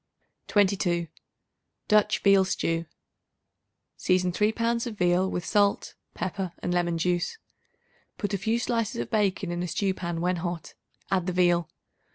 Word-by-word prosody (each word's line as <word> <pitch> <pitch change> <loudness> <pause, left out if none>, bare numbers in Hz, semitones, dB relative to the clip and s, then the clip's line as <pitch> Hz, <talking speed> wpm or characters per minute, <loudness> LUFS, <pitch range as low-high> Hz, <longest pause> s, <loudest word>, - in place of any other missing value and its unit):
22. 185 -4 +2 0.8
Dutch 210 -1 +3
Veal 195 -1 +6
Stew. 165 -3 -1 1.1
Season 185 0 +2
3 210 +4 +2
pounds 230 +1 0
of 220 -3 -6
veal 180 +1 +2
with 175 - -3
salt, 205 -1 +1 0.2
pepper 185 -1 -3
and 175 - -2
lemon 175 -1 +1
juice. 175 - 0 0.8
Put 205 0 -3
a 200 - 0
few 220 +4 +1
slices 230 - -1
of 120 - -4
bacon 195 -3 +1
in 175 0 -2
a 180 - -2
stew 195 +2 0
pan; 170 -2 -4
when 180 +1 0
hot, 170 -1 -5 0.4
add 185 -2 +1
the 180 - -1
veal. 175 -2 +2
185 Hz, 150 wpm, -27 LUFS, 175-205 Hz, 1.1 s, Veal